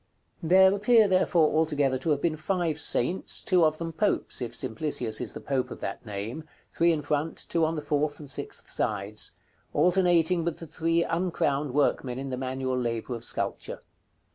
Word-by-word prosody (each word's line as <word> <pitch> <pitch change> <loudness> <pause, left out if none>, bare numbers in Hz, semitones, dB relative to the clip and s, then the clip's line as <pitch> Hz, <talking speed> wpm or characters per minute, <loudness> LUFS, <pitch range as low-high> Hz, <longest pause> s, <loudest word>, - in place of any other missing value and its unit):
There 190 +3 +6
appear, 215 +2 +4
therefore, 175 -5 +3
altogether 145 -4 +1
to 145 - -3
have 145 -2 +1
been 165 -2 +1
five 165 -1 -1
saints, 165 +5 +1
two 180 -2 +3
of 155 0 +2
them 165 0 -5
popes, 205 -6 -1
if 120 - -3
Simplicius 115 -2 -1
is 120 - -5
the - - -5
pope 135 -2 -2
of - - -8
that - - -5
name 105 +9 -5 0.3
(three 170 0 +3
in 155 -3 -1
front, 150 +2 -1
two 165 - +1
on 160 +1 -1
the 150 - -4
fourth 145 0 0
and 150 - -10
sixth 135 - -5
sides), 105 0 -2 0.4
alternating 175 -2 +3
with 170 -1 -2
the 165 - -8
three 165 +2 0
uncrowned 150 -6 -1
workmen 135 -3 +1
in 135 0 -5
the - - -1
manual 130 0 -2
labor 120 0 -3
of 115 -1 -6
sculpture. - - -3
155 Hz, 180 wpm, -27 LUFS, 130-170 Hz, 0.4 s, There